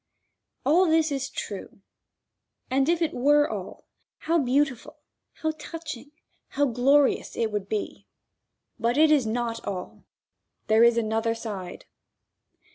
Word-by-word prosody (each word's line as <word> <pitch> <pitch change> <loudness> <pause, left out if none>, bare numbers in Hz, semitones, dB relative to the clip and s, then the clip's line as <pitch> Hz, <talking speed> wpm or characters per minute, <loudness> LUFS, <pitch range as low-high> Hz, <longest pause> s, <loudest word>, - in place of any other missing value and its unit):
All 345 +7 +4
this 320 -1 +3
is 275 -1 -2
true, - - -7 0.9
and 270 +3 +2
if 340 0 +2
it 320 - -1
were 290 +4 +4
all, - - -7 0.3
how 335 +1 +1
beautiful, 270 -2 0 0.4
how 315 - +1
touching, 310 -4 -8 0.4
how 285 +1 0
glorious 275 +3 +2
it 225 -2 0
would 205 -1 -3
be. 215 - -4 0.7
But 235 +3 0
it 310 0 +5
is 280 -7 +3
not 230 0 -2
all. 185 -2 -6 0.6
There 220 +1 +4
is 235 0 +5
another 225 0 0
side. 200 -6 -7
265 Hz, 125 wpm, -26 LUFS, 230-305 Hz, 0.9 s, it